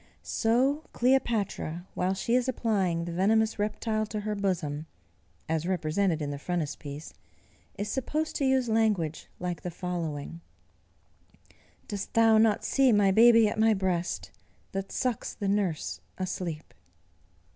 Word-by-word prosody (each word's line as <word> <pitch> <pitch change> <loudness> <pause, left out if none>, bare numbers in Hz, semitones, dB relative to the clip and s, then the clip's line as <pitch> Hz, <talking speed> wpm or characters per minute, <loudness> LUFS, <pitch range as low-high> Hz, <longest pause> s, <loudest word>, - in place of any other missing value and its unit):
So 260 +7 +1
Cleopatra, 225 -9 0
while 185 +1 0
she 230 +4 -1
is 250 +1 +2
applying 195 -9 0
the 170 - -4
venomous 220 +5 +2
reptile 215 +1 -1
to 215 -1 -4
her 210 0 -2
bosom, 170 -7 -2 0.6
(as 160 +1 -1
represented 170 -1 0
in 145 - -3
the 140 - -5
Frontispiece,) 150 -3 -4 0.6
is 205 +2 -2
supposed 300 +7 -2
to 280 - 0
use 265 -2 +2
language 215 -8 +1
like 180 -1 -3
the 180 - -4
following, 170 -3 -4 1.5
"Dost 200 -3 -5
thou 225 -1 +6
not 220 -1 +3
see 270 -2 +4
my 205 -3 +4
baby 230 +1 +7
at 210 - -3
my 220 0 +5
breast, 185 -2 -2 0.4
That 195 0 -4
sucks 250 -4 -2
the 200 - -3
nurse 195 -6 -1 0.2
asleep?" 175 -4 -4
200 Hz, 135 wpm, -28 LUFS, 170-225 Hz, 1.5 s, baby